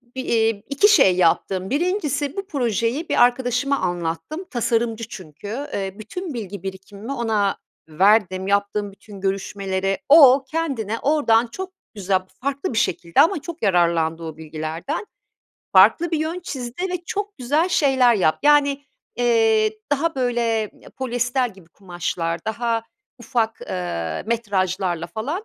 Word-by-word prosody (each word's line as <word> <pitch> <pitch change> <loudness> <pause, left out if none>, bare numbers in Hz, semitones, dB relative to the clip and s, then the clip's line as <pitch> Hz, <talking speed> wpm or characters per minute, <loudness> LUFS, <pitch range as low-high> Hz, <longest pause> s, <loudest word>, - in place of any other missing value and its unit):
Bi 260 - -2
iii, 225 -4 +1
2 280 +9 +4
şey 270 - +5
yaptım. 185 +2 +1
1'incisi 295 - -1
bu 395 0 -4
projeyi 245 - -1
bir - - +5
arkadaşıma 250 +2 +1
anlattım, 175 - -3
tasarımcı 230 -2 -1
çünkü. 165 +1 -10 0.3
Eee, 195 -1 -3
bütün 325 - -6
bilgi 200 -5 -6
birikimimi 195 +5 -7
ona 220 -5 0 0.3
verdim. 190 +2 +3
Yaptığım 200 0 0
bütün 200 0 -13
görüşmeleri 195 0 -2
o, 275 -3 +8
kendine 260 -10 -2
oradan 245 -6 +3
çok 375 +10 -7 0.2
güzel, 195 -2 0 0.2
farklı 275 -1 -2
bir - - -3
şekilde 170 0 +2
ama 330 0 +2
çok 340 -3 -8
yararlandı 170 -4 +2
o 160 -1 -7
bilgilerden. 160 - -5 0.7
Farklı 215 - +5
bir 320 - 0
yön 320 +3 -2
çizdi 260 -2 -6
ve 355 -1 -4
çok 410 +2 -4
güzel 290 +8 +1
şeyler 265 -8 +4
yap 175 -7 +2
Yani, 285 -1 +3 0.3
eee, 225 -2 +2
daha, 320 +4 0
böyle, 245 -2 0 0.4
ya - - -15
polyester 245 0 0
gibi 190 -5 -17
kumaşlar, 175 -2 -4
daha 230 +1 -1 0.4
ufak, 230 -1 -1
eee, 85 -3 -4
metrajlarla 190 -6 -1
falan. 265 - -4
225 Hz, 135 wpm, -22 LUFS, 190-275 Hz, 0.7 s, o